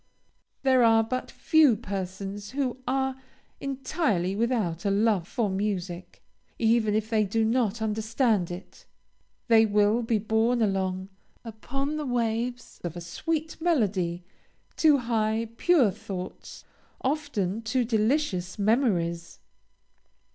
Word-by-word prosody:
There 260 -2 +4
are 225 -1 +5
but 255 +3 -3
few 310 -7 +4
persons 195 -1 -5
who 260 0 -2
are 265 0 -1 0.4
entirely 265 - -1
without 215 -7 0
a 200 - +1
love 200 -3 +2
for 230 0 -1
music, 190 -3 -4 0.3
even 225 -2 +2
if 215 0 0
they 215 -1 +3
do 220 +3 0
not 225 -2 0
understand 220 -2 +1
it. 175 +2 -10 0.6
They 225 -2 +6
will 210 +2 +3
be 230 -1 +1
borne 220 +3 +1
along 190 -3 -1 0.4
upon 275 +7 -4
the 300 - -3
waves 240 0 -2
of 175 -1 -4
a - - -4
sweet 315 - -3
melody 195 - 0 0.5
to 305 -3 +5
high, 225 -2 0
pure 310 - +4
thoughts, 195 -3 -8 0.4
often 260 - -1
to 255 0 +1
delicious 220 - 0
memories. 195 -7 0
220 Hz, 120 wpm, -27 LUFS, 195-250 Hz, 0.6 s, They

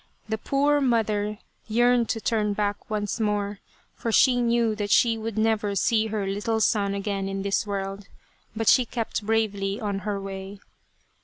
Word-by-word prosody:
The 220 0 -2
poor 285 +4 +2
mother 215 -4 +1 0.3
yearned 240 +1 +3
to 225 - -1
turn 215 -2 0
back 205 0 -2
once 210 +1 -2
more, 205 -2 -1 0.3
for 230 - -3
she 245 +2 +4
knew 235 -1 +2
that 205 -1 -3
she 230 +2 +4
would 225 -1 -5
never 215 -2 +1
see 220 +3 +2
her 215 -2 -2
little 210 +3 -1
son 200 -2 +1
again 195 -1 -2
in 195 0 -3
this 200 +1 0
world; 195 0 -4 0.5
but 225 0 -2
she 255 - +6
kept 230 -2 -3
bravely 205 -2 0
on 205 -3 -2
her 205 0 -3
way. 195 0 -7
210 Hz, 165 wpm, -25 LUFS, 200-225 Hz, 0.5 s, she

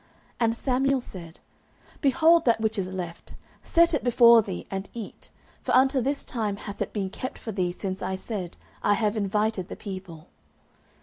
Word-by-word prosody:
And 230 -1 +1
Samuel 270 +1 +1
said, 175 -8 -10 0.6
Behold 320 +4 +5
that 230 -2 +3
which 220 -1 -1
is 185 -1 -3
left! 175 -3 -7 0.3
set 335 0 +3
it 300 - 0
before 235 -1 +7
thee, 90 - -6
and 195 0 -4
eat: 225 -3 -8 0.3
for - - 0
unto 265 0 +4
this 275 +3 -1
time 215 -4 -2
hath 200 -1 -8
it - - -2
been 195 -3 -3
kept 255 +4 -6
for 220 - -6
thee 185 -3 -1
since 185 +1 -5
I 190 +1 -2
said, 190 -3 -5 0.2
I 205 - +3
have 215 -1 0
invited 210 -2 0
the - - -7
people. 185 -6 -8
215 Hz, 175 wpm, -26 LUFS, 190-245 Hz, 0.6 s, before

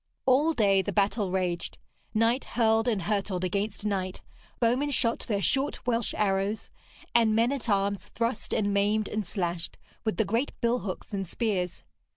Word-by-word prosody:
All 285 +5 +4
day 200 -7 +4
the 200 - -3
battle 200 0 +1
raged. 180 -2 -2 0.3
Knight 230 +4 +2
hurled 225 -1 +2
and 210 -6 +1
hurtled 195 -2 -1
against 200 +3 -2
knight, 190 -3 -2 0.4
bowmen 250 +5 +2
shot 235 -4 +2
their 200 -3 -2
short 275 +2 +1
Welsh 235 -2 0
arrows, 200 +1 0 0.4
and 225 -2 +4
men 230 +3 +3
at 255 -4 -3
arms 200 -1 +1
thrust 230 0 -2
and 205 -1 +1
maimed 205 +1 +2
and 215 0 -2
slashed 175 -3 -3 0.3
with 220 - -1
the 220 - +2
great 230 +8 0
billhooks 235 -5 -2
and 195 -2 -2
spears. 185 -4 -2
210 Hz, 160 wpm, -28 LUFS, 195-230 Hz, 0.4 s, All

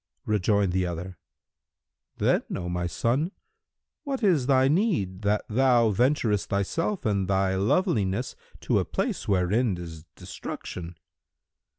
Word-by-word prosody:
Rejoined 100 -2 +2
the 90 0 0
other, 90 +2 -6 1.0
"Then, - - +2
O 90 - -4
my 90 0 -2
son, 130 - 0 0.7
what 275 -5 -3
is 165 -11 +3
thy 130 -1 +4
need 150 - 0
that 105 0 0
thou 120 -1 +3
venturest 115 -2 +1
thyself 165 - -1
and 100 -3 +1
thy 95 0 +1
loveliness 100 - 0 0.3
to - - +1
a - - +1
place - - -2
wherein 100 +2 +1
is 80 -2 -9
destruction?" 85 -1 -7
105 Hz, 120 wpm, -26 LUFS, 95-130 Hz, 1.0 s, thy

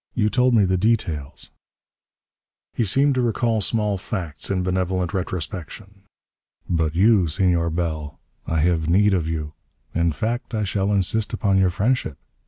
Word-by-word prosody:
"You 105 -3 +1
told 125 -1 +3
me 105 -3 +5
the 95 0 +1
details." 85 -10 -1 1.2
He - - 0
seemed 135 +8 +3
to 130 - 0
recall 115 -1 0
small 105 -1 0
facts 85 -6 -4
in 95 -2 0
benevolent 90 -1 -1
retrospection. 95 +2 -5 0.7
"But 80 -2 0
you, 100 -1 +4
Senor 85 0 +1
Bell, 80 -3 -3 0.3
I 80 -1 0
have 80 -1 +1
need 100 +3 +4
of 85 -4 0
you. 75 -2 -4 0.4
In 85 0 +1
fact, 115 - -3
I 105 - 0
shall 100 0 0
insist 105 +2 0
upon 100 -2 +2
your 95 -1 +3
friendship. 100 - -1
95 Hz, 150 wpm, -22 LUFS, 85-105 Hz, 1.2 s, me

